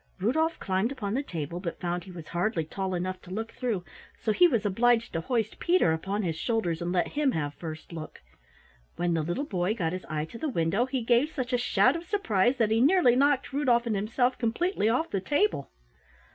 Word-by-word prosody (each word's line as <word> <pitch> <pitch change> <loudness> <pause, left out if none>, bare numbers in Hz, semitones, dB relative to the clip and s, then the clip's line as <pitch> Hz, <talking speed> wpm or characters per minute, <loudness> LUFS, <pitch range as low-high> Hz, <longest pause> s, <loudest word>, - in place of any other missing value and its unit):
Rudolf 315 - +1
climbed 190 +5 0
upon 205 -7 -3
the 265 - +1
table, 170 - -5
but 175 -2 -5
found 175 0 -3
he 190 - -10
was 165 -3 -10
hardly 175 -1 0
tall 190 +3 -3
enough 185 +1 -3
to - - -14
look 220 +4 -4
through, 220 -8 -2 0.3
so 220 - 0
he 355 +11 +6
was 235 -10 0
obliged 230 +3 +2
to 165 - -1
hoist 225 +2 -1
Peter 345 - +3
upon 195 +6 -2
his 165 -3 -1
shoulders 175 -4 -1
and 175 +1 -2
let 180 -1 +1
him 290 -3 +1
have 145 -2 -2
first 160 +1 -8
look. 155 -2 -8 0.8
When 175 -1 0
the 165 - +1
little 175 - -2
boy 190 -3 -1
got 170 -6 -1
his 185 - -5
eye 155 0 -2
to 230 +8 -10
the 315 - -1
window 195 +3 +1
he 260 -2 -2
gave 240 +5 +3
such 255 -5 -4
a - - +4
shout 255 +2 +3
of 335 +1 -5
surprise 245 - +2
that 225 -3 +2
he 225 +1 +3
nearly 285 -4 +5
knocked 280 0 +2
Rudolf 250 -4 +2
and 225 -3 0
himself 245 +5 0
completely 235 - +1
off 255 +8 0
the 195 - -1
table. 190 - 0
215 Hz, 215 wpm, -28 LUFS, 175-255 Hz, 0.8 s, he